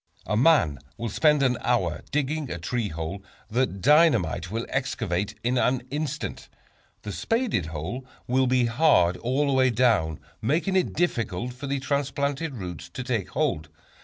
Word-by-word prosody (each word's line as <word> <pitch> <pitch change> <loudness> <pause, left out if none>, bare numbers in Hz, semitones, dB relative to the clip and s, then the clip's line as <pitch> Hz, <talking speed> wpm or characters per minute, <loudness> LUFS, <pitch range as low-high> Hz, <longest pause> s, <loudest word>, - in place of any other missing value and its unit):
A 105 - -1
man 115 - +4 0.2
will 115 0 -3
spend 150 +5 +3
an 125 -2 +2
hour 90 -11 0
digging 150 0 -1
a 85 - -3
tree 110 +7 -2
hole 85 +3 -5 0.3
that 115 -5 0
dynamite 125 - +4
will 115 +3 -3
excavate 110 -7 -2
in 125 +1 +1
an 125 0 +1
instant. 150 0 -4 0.5
The 105 - -5
spaded 225 - 0
hole 80 - -5 0.2
will 130 +1 +2
be 125 -1 +3
hard 115 - +4
all 130 +5 0
the 140 - +1
way 130 -1 +4
down, 110 - +2 0.2
making 160 - +1
it 185 - +1
difficult 120 - -1
for 135 +3 -7
the 140 0 -1
transplanted 140 +2 -1
roots 90 -6 -7
to 125 - -6
take 120 -7 -2
hold. 75 0 -1
125 Hz, 160 wpm, -26 LUFS, 100-140 Hz, 0.5 s, man